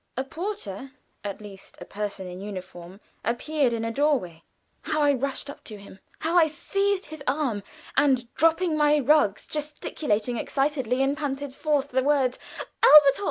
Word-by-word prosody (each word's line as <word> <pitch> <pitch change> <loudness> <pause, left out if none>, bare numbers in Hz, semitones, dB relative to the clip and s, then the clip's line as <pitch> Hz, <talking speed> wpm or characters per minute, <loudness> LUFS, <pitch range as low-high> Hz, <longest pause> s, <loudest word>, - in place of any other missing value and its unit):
A 260 - 0
porter 270 - -6 0.3
at 200 0 -5
least 200 -2 -12
a - - -8
person 205 -2 -5
in 180 +1 -8
uniform, 185 -2 -8 0.2
appeared 260 +4 0
in 230 -1 -2
a 230 - -2
door 290 +4 +3
way. 170 -7 -10 0.4
How 305 - -2
I 290 -1 +4
rushed 275 +1 -2
up 280 - -9
to 215 - -6
him! 200 -1 -14 0.2
How 325 +2 -2
I 335 -3 +6
seized 395 +6 -1
his 310 -1 -9
arm, 255 -6 0 0.3
and 255 -4 +2
dropping 330 +2 +2
my 300 0 +4
rugs 285 -7 +3
gesticulated 290 -6 -2
excitedly 270 -1 0
and 275 +1 +1
panted 285 -2 -4
forth 290 -1 0
the 260 +1 +1
word 270 -2 +1 0.4
"Elberthal!" 285 -2 +8
270 Hz, 160 wpm, -26 LUFS, 215-300 Hz, 0.4 s, Elberthal